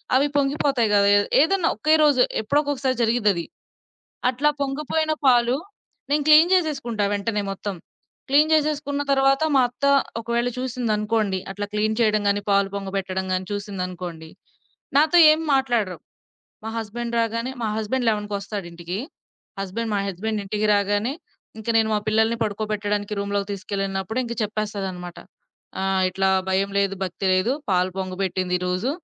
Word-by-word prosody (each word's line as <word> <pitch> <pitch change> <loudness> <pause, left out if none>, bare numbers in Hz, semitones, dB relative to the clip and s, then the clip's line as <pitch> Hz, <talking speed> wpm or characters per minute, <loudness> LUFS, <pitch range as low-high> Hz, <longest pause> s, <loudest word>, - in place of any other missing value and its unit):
అవి 275 +3 +4
పొంగిపోతాయి 275 -4 +1
కదే 200 0 +5 0.3
ఏదన్నా 345 +2 +2
ఒకే 310 0 +2
రోజు 285 -4 +4 0.2
ఎప్పుడోక్కకసారి 275 +2 0
జరిగిదది. 210 -7 +1 0.8
అట్లా 275 +4 +1
పొంగిపోయిన 305 +3 -1 0.2
పాలు 240 -1 +4 0.5
నేను 290 0 +2
క్లీన్ 310 +3 +7
జేసేసుకుంటా 270 - 0
వెంటనే 205 +1 -1
మొత్తం. 195 0 -5 0.5
క్లీన్ 295 +3 +4
జేసేసుకున్న 295 -2 0
తరువాత 270 +1 +3
మా 265 - +6
అత్త 245 +3 -5 0.4
ఒకవేళ 235 +1 -1
చూసిందనుకోండి, 220 -5 -1
అట్లా 205 +1 -4
క్లీన్ 215 +1 0
చేయడం 215 -2 +3
గాని, 200 0 +1
పాలు 200 0 +3
పొంగబెట్టడం 190 -1 -3
గాని, 185 0 -1
చూసిందనుకోండి, 180 -5 -5 0.7
నాతో 310 +4 +4
ఏమి 315 +1 +1
మాట్లాడరు. 240 -8 0 0.7
మా 225 - -4
హస్బెండ్ 235 +2 -5
రాగానే 230 +3 -2
మా 220 - 0
హస్బెండ్ 230 +3 -1
ఎలెవెన్‌కొస్తాడింటికి. 200 -4 -4 0.6
హస్బెండ్ 220 +4 -3
మా 200 - +1
హస్బెండ్ 210 +3 -3
ఇంటికి 210 +2 -1
రాగానే 205 +5 +1 0.5
ఇంక 220 - -10
నేను 220 -1 +2
మా 210 - +1
పిల్లల్ని 220 +2 +2
పడుకోబెట్టడానికి 210 -1 -2
రూమ్‌లోకి 200 0 -2
తీసుకెళ్ళినప్పుడు 195 +2 -3
ఇంక 235 - -4
చెప్పేస్తాదన్నమాట. 200 -4 -4 0.6
ఆహ్, 190 0 +1
ఇట్లా 190 +1 0 0.2
"భయం 195 +1 +1
లేదు, 200 -1 +1
భక్తి 185 +1 -4
లేదు, 185 +7 +1 0.2
పాలు 185 0 +2
పొంగబెట్టిందిరోజు 185 +2 -1
215 Hz, 130 wpm, -23 LUFS, 195-255 Hz, 0.8 s, క్లీన్